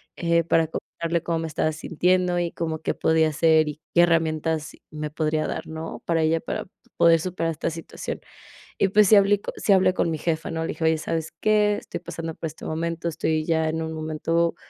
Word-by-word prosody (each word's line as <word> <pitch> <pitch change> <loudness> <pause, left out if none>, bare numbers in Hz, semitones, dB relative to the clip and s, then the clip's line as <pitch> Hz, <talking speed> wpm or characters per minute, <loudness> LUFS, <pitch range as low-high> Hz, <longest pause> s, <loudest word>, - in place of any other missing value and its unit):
eh, 170 -1 +2
para 165 0 +2
contarle 165 +1 -3
cómo 165 -1 -1
me 165 - -3
estaba 155 0 0
sintiendo 180 +3 +1
y 170 -1 -1
cómo 160 -2 -3
qué - - -1
podía 160 -1 +2
hacer 155 0 +3
y 150 +1 -7 0.2
qué 175 - +7
herramientas 160 -2 +1 0.2
me 150 0 -4
podría 155 0 -1
dar, - - -4
¿no?, 160 +1 -7
para 165 -2 +1
ya, 165 +1 +2
para - - -4 0.3
poder 165 -1 +5
superar 165 -2 -2
esta 155 - -2
situación, 165 0 -6 0.6
y - - +4
pues 210 +1 +5
sí 215 - +8
habl 200 0 +4 0.2
sí 200 - +2
hablé 190 -1 +4
con 165 - +1
mi 160 - -3
jefa, 160 0 -2
¿no?, 160 0 -2
le 165 - -2
dije: 160 - -4
"Oye, 160 0 +4
¿sabes 160 0 -3
qué?, 210 -1 +3
estoy - - -6
pasando 165 -1 -6
por - - -5
este 160 0 -8
momento, 165 +1 -2
estoy 155 -1 -1
ya 160 -1 +1
en 160 +1 -2
un 160 0 -4
momento 160 +2 0
165 Hz, 210 wpm, -24 LUFS, 160-170 Hz, 0.6 s, sí